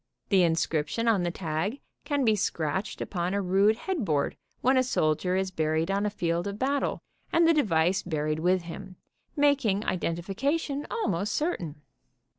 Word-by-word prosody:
"The 195 -3 +5
inscription 165 +4 0
on 220 -5 +4
the 175 - 0
tag 170 - -3 0.3
can 285 -3 0
be 220 -2 +4
scratched 190 0 -2
upon 180 0 -2
a 200 - +1
rude 195 +4 +4
headboard 210 - -1 0.3
when 260 +2 +3
a 260 - +5
soldier 180 -6 +1
is 190 0 0
buried 160 +1 0
on 200 +1 +1
a - - +1
field 170 -3 -1
of 200 0 -4
battle 275 +4 -1 0.3
and 335 0 +4
the 330 - +6
device 185 - +2
buried 155 -2 -2
with 180 +2 +2
him, 175 +2 -8 0.4
making 275 -9 +2
identification 270 - -1
almost 210 - -1
certain. 170 - -2
190 Hz, 155 wpm, -28 LUFS, 165-240 Hz, 0.4 s, the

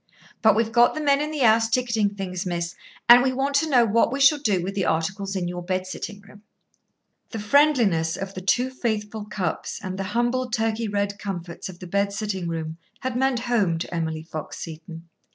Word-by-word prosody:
But 220 -3 +5
we've 225 0 +1
got 240 +1 +4
the - - -2
men 285 -2 +3
in 300 - -2
the 300 -5 0
house 225 0 +4
ticketing 225 -4 +1
things, 185 -2 -4
miss, 170 -2 -3 0.3
and 240 +1 +10
we 260 +1 +2
want 270 +2 -1
to 315 +2 +1
know 245 -4 +5
what 230 +2 +2
we 275 - -2
shall 280 +2 +6
do 205 -10 +1
with 195 +2 -3
the 195 -1 -1
articles 195 +5 -1
in 180 -2 -1
your 175 0 -4
bed 185 +1 -2
sitting 200 +2 -7
room." 205 0 -17 0.9
The 225 - -6
friendliness 210 - +3
of 195 0 -5
the 185 - -6
two 245 +7 +1
faithful 220 -4 -3
Cupps 195 -6 -3
and 190 0 -5
the 195 - -2
humble 245 +1 +1
Turkey 225 0 -1
red 200 0 -2
comforts 175 -4 -6
of 180 - -10
the 180 - -9
bed 200 +2 0
sitting 195 -3 -3
room 160 -1 -4 0.2
had 255 -1 -3
meant 260 -1 +1
home 220 -9 +1
to 165 - -5
Emily 160 -2 -2
Fox 155 -2 -7
Seton. 165 +1 -8
205 Hz, 205 wpm, -24 LUFS, 180-240 Hz, 0.9 s, and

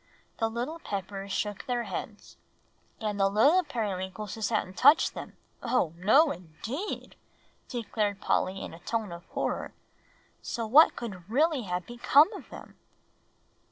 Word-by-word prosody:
The 225 - +1
little 245 +9 -4
Peppers 195 - -5
shook 205 0 -3
their 245 -1 0
heads. - - -7 0.6
"And 210 -2 -3
the 195 0 +4
little 280 - +4
Periwinkleses 210 - -3
hadn't 210 -4 -1
touched 285 - +5
them - - -9 0.2
oh, 235 -10 +1
no 245 - +5
indeed!" 220 - -6 0.5
declared 215 -4 -2
Polly 190 -1 0
in - - -7
a 165 - -11
tone 220 +1 -3
of 170 +1 -9
horror - - -3 0.7
"so 230 -2 -3
what 285 +9 +7
could 195 -6 -7
really 285 0 +2
have 180 -1 -3
become 275 +7 +4
of - - -10
them?" - - -12
220 Hz, 135 wpm, -29 LUFS, 195-255 Hz, 0.7 s, what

